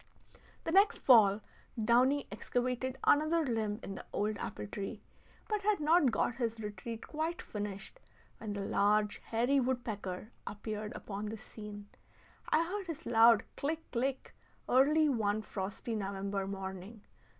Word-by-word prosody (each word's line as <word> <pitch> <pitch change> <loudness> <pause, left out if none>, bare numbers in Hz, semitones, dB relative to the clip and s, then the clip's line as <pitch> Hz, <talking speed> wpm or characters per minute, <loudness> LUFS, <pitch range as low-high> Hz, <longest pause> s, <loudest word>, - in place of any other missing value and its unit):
The 325 - -2
next 395 +4 +5
fall, 215 -5 +6 0.4
the 225 - -1
downy 255 +5 +4
excavated 250 +4 -2
another 310 +2 +4
limb 220 -4 -1
in 195 - -5
the - - -8
old 210 +1 0
apple 105 - -5
tree, 200 - -5 0.5
but 425 -2 -1
had 420 0 +2
not 305 -1 +4
got 230 +1 0
his 230 -2 -2
retreat 215 +2 -6
quite 320 +2 -3
finished, 205 - -6 0.4
when 215 -2 -4
the 200 - -3
large 210 +1 +2
hairy 245 +5 +1
woodpecker 225 -6 -3 0.2
appeared 210 0 -5
upon 205 +1 -5
the 220 +1 -5
scene. 210 -2 -9 0.6
I 320 +2 +3
heard 385 +2 -4
his 330 -1 -6
loud 230 -1 +6
click, 320 +3 -3
click, 265 +2 -2 0.3
early 300 +5 +5
one 215 -5 +1
frosty 195 +4 -4
November 195 -1 -2
morning. 195 +2 -6
225 Hz, 140 wpm, -33 LUFS, 205-275 Hz, 0.6 s, fall